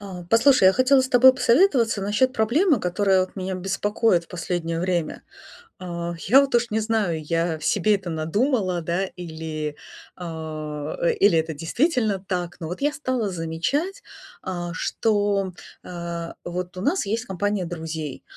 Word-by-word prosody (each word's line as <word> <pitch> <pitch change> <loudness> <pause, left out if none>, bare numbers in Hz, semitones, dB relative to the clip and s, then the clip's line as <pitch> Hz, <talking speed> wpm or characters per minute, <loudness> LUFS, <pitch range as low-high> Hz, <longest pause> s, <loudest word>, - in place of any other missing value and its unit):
А, 185 -3 -8
послушай, 230 0 +5
я 185 - +8
хотела 255 +4 +4
с 260 - -1
тобой 260 +1 +7
посоветоваться 240 - +3
насчет 210 +6 +1
проблемы, 260 - +2
которая 190 +1 +2
вот 185 +2 -4
меня 190 0 -3
беспокоит 195 0 0
в - - -27
последнее 170 -2 -3
время. 175 -3 -2 0.6
А, 170 -1 -5
я 255 +8 +7
вот 275 -2 +2
уж 235 -1 +1
не 220 - +1
знаю, 215 -7 0
я 165 +1 -1
себе 205 +6 +2
это 190 -3 -6
надумала, 185 - 0
да, 170 +4 -1
или, 160 -3 -5 0.4
а, 155 -3 -6
э, 170 - +3
или 200 -4 +4
это 160 0 -1
действительно 215 - 0
так, 180 -2 -4
но 160 - -4
вот 180 - -6
я 290 +1 +1
стала 255 -7 -2
замечать, 185 - -2 0.4
а, 175 -2 -4
что, 205 +1 0 0.3
э, 170 -1 -5 0.2
вот 180 +1 -5
у - - -4
нас 355 - +1
есть 220 +4 -2
компания 200 -1 -1
друзей, 160 -4 -6
185 Hz, 155 wpm, -23 LUFS, 170-225 Hz, 0.6 s, я